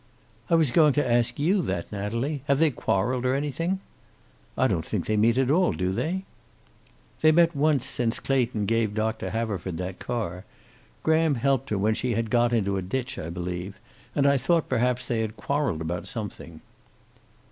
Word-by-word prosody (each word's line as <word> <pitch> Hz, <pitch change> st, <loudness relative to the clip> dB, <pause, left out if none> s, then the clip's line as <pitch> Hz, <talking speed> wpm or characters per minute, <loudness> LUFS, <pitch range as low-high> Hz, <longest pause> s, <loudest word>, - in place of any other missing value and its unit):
"I -, -, +4 dB
was 160 Hz, -6 st, +3 dB
going 150 Hz, 0 st, +5 dB
to 145 Hz, -2 st, +1 dB
ask 120 Hz, 0 st, +2 dB
you 180 Hz, +7 st, +2 dB
that, 85 Hz, -, -3 dB
Natalie. 115 Hz, +8 st, -2 dB
Have 140 Hz, -1 st, +3 dB
they 160 Hz, 0 st, +4 dB
quarreled, 120 Hz, +2 st, 0 dB
or 130 Hz, +1 st, +2 dB
anything?" 165 Hz, +7 st, -1 dB, 0.8 s
"I -, -, +3 dB
don't -, -, +1 dB
think -, -, -3 dB
they 110 Hz, -, 0 dB
meet 115 Hz, +3 st, +3 dB
at 135 Hz, 0 st, +2 dB
all, 180 Hz, +4 st, +3 dB
do 90 Hz, 0 st, -1 dB
they?" 175 Hz, -, -2 dB, 1.0 s
"They 155 Hz, -, +6 dB
met 170 Hz, +1 st, +4 dB
once 140 Hz, -3 st, +2 dB
since 120 Hz, -3 st, 0 dB
Clayton 125 Hz, -6 st, 0 dB
gave 110 Hz, -1 st, 0 dB
Doctor 110 Hz, +1 st, -1 dB
Haverford 100 Hz, -6 st, -3 dB
the 90 Hz, +2 st, -4 dB
car. 95 Hz, -3 st, -4 dB, 0.6 s
Graham 160 Hz, -2 st, +3 dB
helped 135 Hz, +1 st, 0 dB
her 105 Hz, -, 0 dB
when 105 Hz, +3 st, +2 dB
she 120 Hz, +1 st, -1 dB
had 115 Hz, -1 st, -2 dB
got 120 Hz, 0 st, +3 dB
into 100 Hz, -4 st, +1 dB
a -, -, -1 dB
ditch, 125 Hz, +7 st, -3 dB
I 80 Hz, -, -5 dB
believe. 90 Hz, +2 st, -5 dB, 0.4 s
And 140 Hz, -, +2 dB
I 140 Hz, 0 st, +5 dB
thought 165 Hz, +4 st, +1 dB
perhaps 125 Hz, 0 st, +1 dB
they 115 Hz, -2 st, -1 dB
had 110 Hz, 0 st, -4 dB
quarreled 140 Hz, -, -1 dB
about 85 Hz, +3 st, -4 dB
something." 95 Hz, -7 st, -6 dB
120 Hz, 180 wpm, -26 LUFS, 105-140 Hz, 1.0 s, They